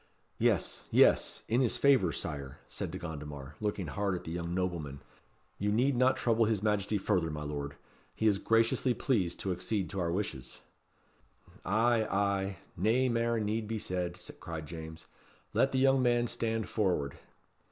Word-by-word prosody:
"Yes, - - +1
yes; - - +4
in 120 +3 +2
his 125 - +2
favour, 130 -11 +4
Sire," 70 -5 -4
said - - -4
De - - -5
Gondomar, 75 -4 -7
looking 105 -3 -1
hard 100 +4 -1
at 90 - -6
the 80 - -6
young 85 0 -3
nobleman. 85 -7 -2 0.6
"You 105 +1 +1
need 125 +5 +2
not 130 +1 +3
trouble 115 -1 +3
his 105 -2 0
Majesty 105 -1 +1
further, 95 -4 +1
my 75 -1 -4
lord. 70 -1 -4 0.4
He 110 - -1
is 100 -3 +4
graciously 115 +3 +2
pleased 100 - 0
to 95 - -1
accede 90 +2 -2
to 100 - -3
our 85 -2 0
wishes." 75 -10 -4 1.0
"Ay, 110 +2 +2
ay; 100 -1 0 0.2
nae 115 +8 +2
mair 115 0 +1
need 110 +1 -1
be 110 +1 -2
said," 90 -3 -3 0.2
cried 80 -2 -6
James. 80 0 -8 0.5
"Let 135 - +3
the 130 - 0
young 135 0 +4
man 120 -1 +3
stand 115 -3 -1
forward." 90 -10 0
100 Hz, 165 wpm, -31 LUFS, 85-115 Hz, 1.0 s, yes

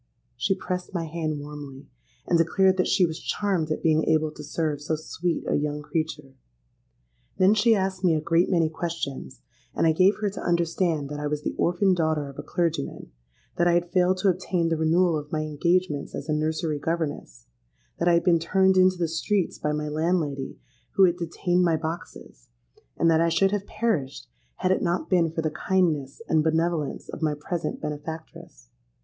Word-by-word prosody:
'—She 195 - 0
pressed 185 0 -5
my 170 -2 -1
hand 155 -2 -3
warmly, 145 -2 -9 0.4
and 170 - +2
declared 190 +3 +3
that 185 - +2
she 185 - +4
was 160 0 -5
charmed 190 -6 -1
at 155 - -2
being 160 -1 +3
able 155 -1 +2
to 150 - -10
serve 150 -1 -2
so 155 +2 -1
sweet 165 +2 -3
a - - 0
young 150 0 -1
creature. 150 -3 -3 1.0
Then 190 +2 +5
she 220 +1 +4
asked 190 -1 -2
me 170 -3 +4
a - - +1
great 165 +3 +2
many 170 -4 +3
questions; 155 - -5 0.3
and - - +2
I 160 - +5
gave 185 +5 +4
her 210 -2 -2
to - - -7
understand 170 -3 0
that 145 0 -5
I 150 - -2
was 150 0 -3
the - - -2
orphan 180 +3 +2
daughter 155 -4 0
of 140 - -10
a - - -2
clergyman; 160 - -2 0.5
that 175 - +3
I 175 - +4
had 175 0 0
failed 185 +1 +3
to 200 - +4
obtain 180 -2 0
the 165 - +1
renewal 165 +2 +2
of 150 0 -11
my 155 - -1
engagements 155 0 0
as 145 - -6
a 155 - 0
nursery 155 0 -1
governess: 145 - -3 0.5
that - - +1
I 175 - +5
had 170 - +2
been 170 -2 +4
turned 190 +3 +3
into 185 0 +5
the 170 -1 0
streets 180 +4 -1
by 150 - -1
my 150 0 -2
landlady, 150 - -1 0.4
who 195 - +5
had 175 -2 +4
detained 175 +1 0
my 165 -2 +3
boxes; 160 - -7 0.5
and 165 - +2
that 160 0 +4
I 170 - +3
should 190 +4 +2
have 205 -1 -2
perished 210 - -2 0.3
had 185 - 0
it 185 - +2
not 175 +3 -1
been 170 -3 +3
for 160 0 -3
the 155 - 0
kindness 160 -2 0
and 160 -1 +3
benevolence 160 -1 -1
of - - -8
my 155 -2 +1
present 170 +3 -3
benefactress. 150 - -8
165 Hz, 195 wpm, -25 LUFS, 150-180 Hz, 1.0 s, Then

